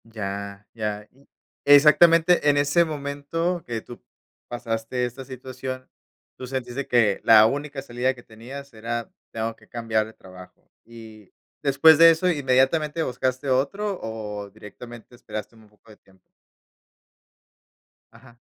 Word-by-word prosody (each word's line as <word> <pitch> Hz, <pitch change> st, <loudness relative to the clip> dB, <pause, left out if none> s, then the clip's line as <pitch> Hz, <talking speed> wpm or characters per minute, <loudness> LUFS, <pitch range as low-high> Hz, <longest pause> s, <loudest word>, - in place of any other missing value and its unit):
Ya, 100 Hz, -2 st, -7 dB
ya. 105 Hz, -2 st, -4 dB
Mm. 135 Hz, +2 st, -25 dB, 0.4 s
Exactamente, 160 Hz, +3 st, +6 dB
en 145 Hz, -, +3 dB
ese 145 Hz, +4 st, +3 dB
momento 155 Hz, +3 st, -3 dB
que 115 Hz, -2 st, -4 dB
tú 120 Hz, -, -12 dB, 0.5 s
pasaste 120 Hz, +1 st, -3 dB
esta 125 Hz, +2 st, -7 dB
situación, 130 Hz, 0 st, -7 dB, 0.5 s
tú 130 Hz, -, -8 dB
sentiste 130 Hz, +1 st, -4 dB
que 115 Hz, -5 st, +2 dB
la 110 Hz, -1 st, +7 dB
única 140 Hz, +3 st, -2 dB
salida 125 Hz, +1 st, -1 dB
que 120 Hz, -, -15 dB
tenías 130 Hz, +5 st, -11 dB
era, 115 Hz, +1 st, -5 dB, 0.2 s
tengo 115 Hz, 0 st, -3 dB
que -, -, -23 dB
cambiar 110 Hz, -2 st, -1 dB
de 110 Hz, -, -14 dB
trabajo. 90 Hz, -2 st, -16 dB
Y 110 Hz, -3 st, -14 dB, 0.3 s
después 155 Hz, +3 st, +6 dB
de 165 Hz, 0 st, +9 dB
eso, 165 Hz, +3 st, +2 dB
¿inmediatamente 150 Hz, +2 st, +1 dB
buscaste 130 Hz, +1 st, -2 dB
otro 180 Hz, +10 st, -1 dB
o 105 Hz, -2 st, -6 dB
directamente 110 Hz, +3 st, -13 dB
esperaste 110 Hz, -1 st, -8 dB
un 110 Hz, -1 st, -20 dB
poco 105 Hz, +1 st, -22 dB
de 105 Hz, -, -16 dB
tiempo? 95 Hz, -1 st, -28 dB, 1.8 s
Ajá. 120 Hz, +1 st, -19 dB
125 Hz, 135 wpm, -24 LUFS, 110-140 Hz, 1.8 s, de